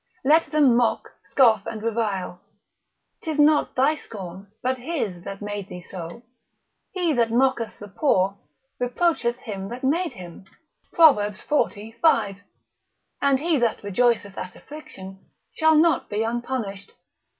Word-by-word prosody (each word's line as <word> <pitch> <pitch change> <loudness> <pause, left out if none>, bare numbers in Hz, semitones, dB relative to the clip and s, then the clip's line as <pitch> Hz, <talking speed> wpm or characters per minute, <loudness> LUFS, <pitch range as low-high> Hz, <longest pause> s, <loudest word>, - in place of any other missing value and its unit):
Let 315 +4 +5
them 290 -6 +4
mock, 235 -1 +1
scoff 225 -7 +3
and 220 -1 -6
revile, 210 -6 -2 0.8
'tis 315 -2 -3
not 295 0 +3
thy 270 +4 +3
scorn, 195 - -9
but 255 +1 0
his 245 - -3
that 195 +1 -7
made 205 -1 -5
thee 180 -1 -8
so; 175 +5 -8 0.7
he 350 -4 0
that 235 -3 +2
mocketh 240 -1 +1
the 205 - -10
poor, 195 -3 +1 0.4
reproacheth 245 -1 0
him 195 -5 -6
that 245 +2 -8
made 330 +6 0
him, 180 0 -11 0.5
Prov. 315 -9 +6 0.5
xi. 210 +2 -11
5. 225 -7 +2 0.8
and 275 -2 +3
he 320 -1 +1
that 235 -3 0
rejoiceth 205 -1 +1
at 185 - -7
affliction, 195 -11 -11 0.3
shall 315 -1 +4
not 325 +1 +3
be 210 +2 -1
unpunished. 230 -4 -4
235 Hz, 135 wpm, -24 LUFS, 200-285 Hz, 0.8 s, Prov